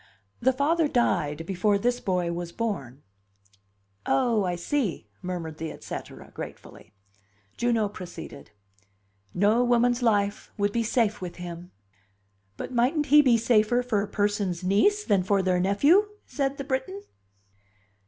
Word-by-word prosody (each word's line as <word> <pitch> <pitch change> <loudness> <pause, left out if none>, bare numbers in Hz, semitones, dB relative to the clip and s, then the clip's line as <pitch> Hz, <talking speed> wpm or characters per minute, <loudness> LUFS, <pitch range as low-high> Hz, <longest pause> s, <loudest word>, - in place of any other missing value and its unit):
"The 260 +2 +3
father 300 +5 +1
died 165 - 0
before 200 +3 +1
this 245 +4 0
boy 180 -4 -1
was 170 0 -5
born." 150 - -4 1.0
"Oh, 215 - +2
I 180 -1 -1
see!" 185 - -2
murmured 170 -4 -5
the 160 - -4
et - - -12
cetera, - - -8
gratefully. - - -10 0.6
Juno 235 -3 +1
proceeded. 180 - -10 0.9
"No 210 +6 +3
woman's 245 0 +2
life 205 -3 0
would 205 0 +1
be 235 - 0
safe 225 -2 0
with 180 -2 -6
him." 175 0 -8 0.9
"But - - -6
mightn't 260 +6 +2
he 295 - +10
be 250 -5 +4
safer 230 +1 +2
for 225 -5 0
a 205 - -3
person's 205 -3 -1
niece 220 - +3
than 200 - +2
for 195 +1 +1
their 185 -1 +1
nephew?" 280 - +4 0.2
said 275 -1 -2
the 275 - -4
Briton. 260 -8 -3
205 Hz, 140 wpm, -26 LUFS, 180-245 Hz, 1.0 s, he